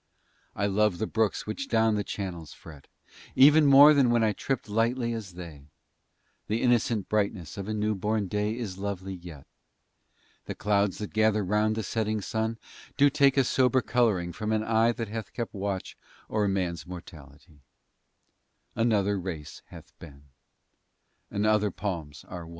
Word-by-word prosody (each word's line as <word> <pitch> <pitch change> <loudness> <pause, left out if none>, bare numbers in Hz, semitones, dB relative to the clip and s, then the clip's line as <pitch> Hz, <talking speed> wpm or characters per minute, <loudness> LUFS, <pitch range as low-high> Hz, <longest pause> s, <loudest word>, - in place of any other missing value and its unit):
I 100 - -1
love 100 -1 +1
the 110 - -1
Brooks 110 -1 -1
which 110 +6 -5
down 110 -1 +2
their 105 -1 -1
channels 85 -8 -6
fret, 75 -3 -14 0.5
Even 150 +2 +7
more 140 +2 +9
than 140 -4 +3
when 120 -1 +3
I 110 -1 +2
tripp'd 130 +5 -3
lightly 115 +3 0
as 105 -5 -6
they; 80 -6 -10 0.8
The 110 +2 -1
innocent 120 -4 +1
brightness 100 -6 -2
of 100 -1 -6
a 110 - -2
new 105 0 0
born 105 +1 -1
Day 105 +3 -2
Is 100 -6 -5
lovely 95 -1 -4
yet; 85 -6 -11 1.0
The - - -6
Clouds 100 -2 +1
that 105 - -6
gather 110 -1 +2
round 105 +3 +1
the 110 - -3
setting 110 +1 -1
sun 110 +2 -2 0.4
Do 145 0 +5
take 140 -1 +3
a 135 - +5
sober 130 0 +2
colouring 105 -8 +1
from 110 +3 -3
an 110 0 +1
eye 115 +1 +3
That 115 -2 -5
hath 110 0 -6
kept 120 -2 -4
watch 100 -2 -4 0.4
o'er 105 -1 +1
man's 90 -4 -2
mortality; 80 -3 -12 1.2
Another 105 -3 +1
race 85 -5 -7
hath - - -14
been, 70 -4 -13 1.1
and 100 +1 -2
other 105 -1 +3
palms 85 -7 -5
are 85 -3 -8
won. - - -12
105 Hz, 160 wpm, -27 LUFS, 95-115 Hz, 1.2 s, more